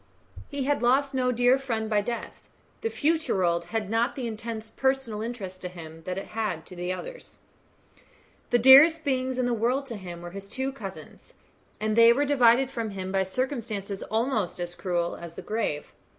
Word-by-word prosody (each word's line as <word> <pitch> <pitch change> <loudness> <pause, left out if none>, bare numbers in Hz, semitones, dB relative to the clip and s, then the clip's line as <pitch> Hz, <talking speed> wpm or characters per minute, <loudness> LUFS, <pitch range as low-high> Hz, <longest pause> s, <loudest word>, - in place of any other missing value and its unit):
He 280 - -3
had 285 +2 0
lost 270 +3 +3
no 255 -1 +1
dear 245 +2 +4
friend 230 -5 -2
by 210 -1 +2
death. 235 +3 -6 0.3
The 450 - -1
future 320 -3 0
world 170 -2 +1
had 220 0 -3
not 225 +4 0
the 260 - -4
intense 220 -1 -5
personal 265 -5 0
interest 205 -6 -6
to 180 - -4
him 165 -2 -10
that 185 0 -3
it 195 - -6
had 205 -8 -3
to 180 -1 -5
others. - - -8 1.1
The 240 - +4
dearest 285 +7 +8
beings 260 -2 0
in 255 - +1
the 245 - +1
world 245 +5 0
to 240 -4 -6
him 175 -3 -8
were 175 - -7
his 195 +1 -8
two 265 +4 -2
cousins, 200 -8 -10 0.4
and 215 0 0
they 230 0 +8
were 285 +4 +1
divided 260 -2 +4
from 230 -4 -3
him 190 -2 -5
by 195 0 +2
circumstances 210 -2 -3
almost 220 -5 -1
as 175 0 -4
cruel 175 -2 -2
as 170 -1 -10
the - - -8
grave. 210 -9 -3
225 Hz, 185 wpm, -27 LUFS, 190-260 Hz, 1.1 s, dearest